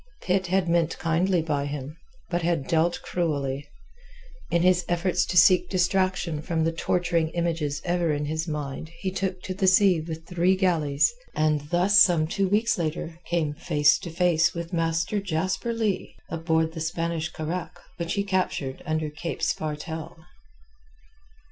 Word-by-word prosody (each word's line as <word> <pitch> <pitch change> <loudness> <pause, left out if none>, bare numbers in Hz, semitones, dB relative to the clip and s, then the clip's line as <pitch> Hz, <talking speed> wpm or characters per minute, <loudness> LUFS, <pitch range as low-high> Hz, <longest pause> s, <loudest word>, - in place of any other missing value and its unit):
Pitt 185 0 +1
had 185 0 +1
meant 170 -1 +1
kindly 170 +2 +1
by 145 -3 -1
him, 145 +1 -6 0.4
but 175 0 0
had 165 -4 0
dealt 170 +1 +1
cruelly. 145 -5 -2 0.8
In 170 0 +2
his 180 -1 +4
efforts 175 +1 +1
to 180 - -1
seek 180 +2 +6
distraction 185 -3 0
from 165 0 -1
the 165 - +1
torturing 170 -1 0
images 165 -4 -1
ever 175 -2 +1
in 150 0 -1
his 160 +3 -2
mind 150 -1 -4
he 190 - -1
took 185 -1 -3
to 185 - -4
the 190 0 0
sea 185 -2 +5
with 160 0 -7
three 180 +1 +2
galleys, 155 -3 +2 0.2
and 150 -1 +1
thus 190 +4 +5
some 175 -7 +5
two 190 +4 -1
weeks 215 +1 +2
later 160 0 -3
came 160 -4 0
face 150 -1 +3
to 170 - -7
face 170 0 +2
with 170 +1 -5
Master 165 +4 0
Jasper 185 +4 -1
Leigh 220 -5 -2 0.2
aboard 160 -1 0
the 160 - -6
Spanish 165 0 -2
carack 165 +1 -5 0.2
which 170 -1 -2
he 200 - +1
captured 185 -9 -2
under 155 -1 -1
Cape 165 +3 -5
Spartel. 160 +2 -3
170 Hz, 155 wpm, -26 LUFS, 155-180 Hz, 0.8 s, seek